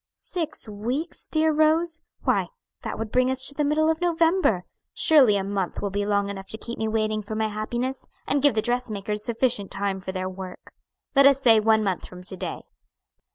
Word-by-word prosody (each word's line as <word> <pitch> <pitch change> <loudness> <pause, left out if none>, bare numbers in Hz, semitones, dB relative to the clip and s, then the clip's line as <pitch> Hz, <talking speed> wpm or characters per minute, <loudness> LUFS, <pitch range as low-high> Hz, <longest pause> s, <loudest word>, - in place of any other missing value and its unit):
"Six 325 -9 -4
weeks, 240 +11 -3
dear 315 0 +2
Rose? 320 +2 +2 0.2
why - - +2 0.3
that - - -5
would 220 -1 -5
bring 255 0 +3
us 260 0 -1
to - - +1
the 295 - -1
middle 305 +2 +2
of 320 +1 +1
November. 335 - +2 0.3
Surely 260 -10 +5
a 195 - -1
month 195 -2 -2
will 200 - -3
be 205 +1 -1
long 200 -1 +1
enough 195 -1 -6
to 220 - -1
keep 235 +1 -7
me 220 - 0
waiting 215 -1 0
for 215 +1 -6
my 220 0 0
happiness, 240 +5 -3 0.2
and 280 0 +1
give 285 -4 +4
the 215 - +1
dressmakers 215 -4 -2
sufficient 230 -4 0
time 195 -1 -2
for 190 0 -5
their 185 0 -3
work. 185 -1 -9 0.4
Let 275 0 +8
us 275 -1 +4
say 230 -5 +6
one 220 0 +3
month 190 -3 -2
from 180 0 -11
to 190 +1 -5
day." - - -5
220 Hz, 200 wpm, -25 LUFS, 200-280 Hz, 0.4 s, Let